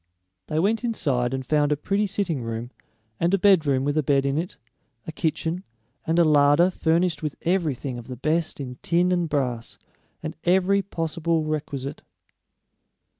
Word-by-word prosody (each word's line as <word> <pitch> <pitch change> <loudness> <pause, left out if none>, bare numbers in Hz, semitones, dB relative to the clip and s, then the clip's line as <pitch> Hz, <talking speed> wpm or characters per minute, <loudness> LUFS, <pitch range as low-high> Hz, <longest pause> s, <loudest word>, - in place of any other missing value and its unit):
They 155 - -2
went 210 +8 +1
inside 135 - 0
and 130 0 -3
found 150 +1 +2
a 150 - +2
pretty 200 +7 0
sitting 180 -8 -1
room, 115 +1 -5 0.5
and 170 +1 +2
a - - +1
bedroom 160 -9 +4
with 145 +1 0
a 155 - +3
bed 140 -1 +2
in 140 0 0
it, 170 +4 -3 0.5
a - - -5
kitchen, 165 +2 -2 0.4
and 165 +1 +1
a 170 - +6
larder 150 +3 +5
furnished 165 -1 +1
with 150 -2 -3
everything 150 -8 -1
of 120 - -11
the 130 - -6
best 155 +6 0
in 125 -2 -6
tin 175 +1 +2
and 175 -2 +1
brass, 125 -5 -2 0.5
and 155 +1 -4
every 190 +2 +3
possible 165 -3 -1
requisite. 145 -3 -4
155 Hz, 165 wpm, -24 LUFS, 140-175 Hz, 0.5 s, a